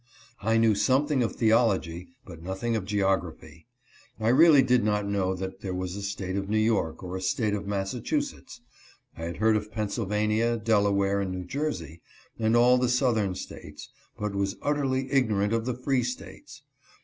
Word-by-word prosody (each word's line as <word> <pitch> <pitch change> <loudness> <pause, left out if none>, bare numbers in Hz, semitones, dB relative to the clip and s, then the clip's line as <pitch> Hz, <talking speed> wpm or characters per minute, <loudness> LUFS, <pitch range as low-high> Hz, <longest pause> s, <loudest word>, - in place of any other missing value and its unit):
I 115 +3 +2
knew 115 -1 +4
something 135 +5 +2
of 115 - -1
theology, 100 -7 +1 0.2
but 85 -3 -11
nothing 95 +6 -2
of 105 -4 -2
geography. 95 -3 -2 0.5
I 110 +1 +1
really 145 +2 +7
did 125 -2 +3
not 105 -1 0
know 95 -2 0
that 95 +1 -6
there 95 -2 -4
was 90 0 -4
a 100 - -5
State 100 -2 -4
of 100 0 -3
New 110 - +1
York, 105 -7 0
or 90 0 -5
a 95 - -4
State 105 +3 0
of 100 -1 -3
Massachusetts. 120 - -3 0.5
I 80 - -6
had 85 0 -5
heard 110 0 +3
of 105 0 -3
Pennsylvania, 105 +1 0
Delaware, 100 -2 +2
and 95 -1 -3
New 90 -1 -5
Jersey, 90 - -4 0.4
and 110 +1 +2
all 125 +1 +5
the 125 -1 +1
Southern 115 -7 +1
States, - - -9 0.3
but 105 -1 -3
was 100 0 -1
utterly 135 -2 0
ignorant 110 -6 +2
of 115 +1 -1
the 125 - -1
free 130 +1 0
States. 125 +1 -7
105 Hz, 175 wpm, -27 LUFS, 95-120 Hz, 0.5 s, really